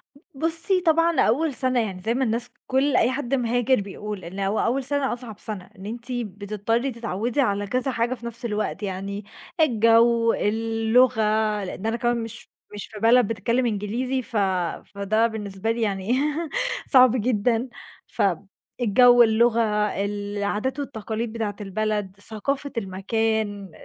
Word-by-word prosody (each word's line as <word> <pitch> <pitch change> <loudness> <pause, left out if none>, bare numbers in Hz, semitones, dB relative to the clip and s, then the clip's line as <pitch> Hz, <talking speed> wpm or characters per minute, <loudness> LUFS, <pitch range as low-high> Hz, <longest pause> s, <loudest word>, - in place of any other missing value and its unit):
ب - - -18 0.3
بُصّي، 335 +3 +2
طبعًا 330 0 +3
أول 285 +6 +2
سَنة 255 -1 0
يعني 195 -5 -2
زي 225 +5 0
ما 260 +2 0
الناس 235 0 -1 0.2
كل 270 +2 +2
أي 245 - +4
حد 270 0 -3
مهاجر 245 -1 +2
بيقول 200 -1 -7
إن 190 +4 -7
هو 195 +2 0
أول 260 +3 +1
سَنة 285 0 -1
أصعب 235 -4 -9
سَنة، 200 -4 -7
إن 190 - -10
أنتِ 235 +3 -6
بتضطرّي 215 +2 -2
تتعوّدي 230 +2 -2
على 205 -5 0
كذا 255 +4 -1
حاجة 235 +1 0
في 235 -2 -9
نَفْس 235 0 -6
الوقت، 210 -2 -2
يعني 195 +1 -4 0.3
الجَو، 230 -3 +4
اللغة 225 +2 +2 0.4
لإن 190 +2 -6
أنا 225 +1 0
كمان 240 -1 0
مش 225 0 -10 0.2
مش 205 - -6
في 215 - -8
بلد 230 0 +5
بتتكلِّم 230 +4 0
إنجليزي، 235 +5 -1
ف 230 -2 -5 0.6
فده 215 +3 +2
بالنسبة 210 -1 -3
لي 230 0 -2
يعني 195 -1 -1
إيه، 295 +5 0 0.4
صعب 255 -3 +7
جدًا. 235 +1 +1 0.4
فالجَو، 225 +6 +3
اللغة، 230 +1 +3 0.4
العادات 205 +5 -2
والتقاليد 225 -4 -4
بتاعة 215 -3 -3
البلد، 205 -1 -2
ثقافة 270 +7 -3
المكان، 205 0 -1
225 Hz, 145 wpm, -24 LUFS, 205-250 Hz, 0.6 s, صعب